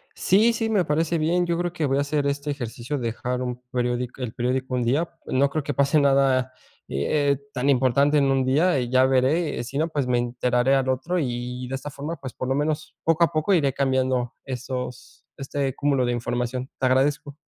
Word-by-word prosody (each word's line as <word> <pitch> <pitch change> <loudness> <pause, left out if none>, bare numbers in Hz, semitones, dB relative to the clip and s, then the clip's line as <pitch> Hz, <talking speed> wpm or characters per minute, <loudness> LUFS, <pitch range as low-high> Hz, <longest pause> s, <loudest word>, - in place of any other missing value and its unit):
Sí, 220 +5 +3
sí, 225 0 -1
me 200 -6 +2
parece 160 +2 0
bien. 170 +3 +1
Yo 170 - 0
creo 175 0 -2
que, 160 -4 -1
voy 135 +1 +1
a - - +2
hacer 145 0 0
este 140 +1 -2
ejercicio, 125 +1 -4
dejar 125 +2 -3
un 125 0 -4
periódico 125 +1 -2
el 115 -3 -4
periódico 130 +1 -1
un 125 - 0
día. 140 +8 +1 0.2
No 140 +2 +2
creo 155 0 -2
que 145 0 -3
pase 140 +2 +3
nada, 135 -2 +3 0.4
y 70 +1 -2
eh, 145 -2 +1
tan 130 0 -2
importante 140 +3 +3
en 140 - +3
un 135 -1 +2
día, 145 +4 +3
ya 130 +1 +3
veré. 135 +3 +1
Si 130 +3 -6
no, 160 - +2
pues, 145 -4 -2
me 125 -1 +1
enteraré 125 +2 +1
al 135 -1 +1
otro, 130 +8 -1
y 125 -3 -3
y - - -8
de 135 - -6
esta 135 +2 -6
forma, 150 +4 -5
pues, 130 -2 -8
por 130 - -5
lo 130 - +1
menos 150 +2 -2
poco 165 +1 +3
a - - +3
poco, 155 +5 +1
iré 140 -6 +2
cambiando 130 -3 0
esos 125 -1 -6
este 135 -1 -3
cúmulo 140 -3 +1
de 120 - 0
información. 125 +2 -2
Te 130 - -1
agradezco. 135 +2 +1
135 Hz, 215 wpm, -24 LUFS, 125-150 Hz, 0.4 s, Sí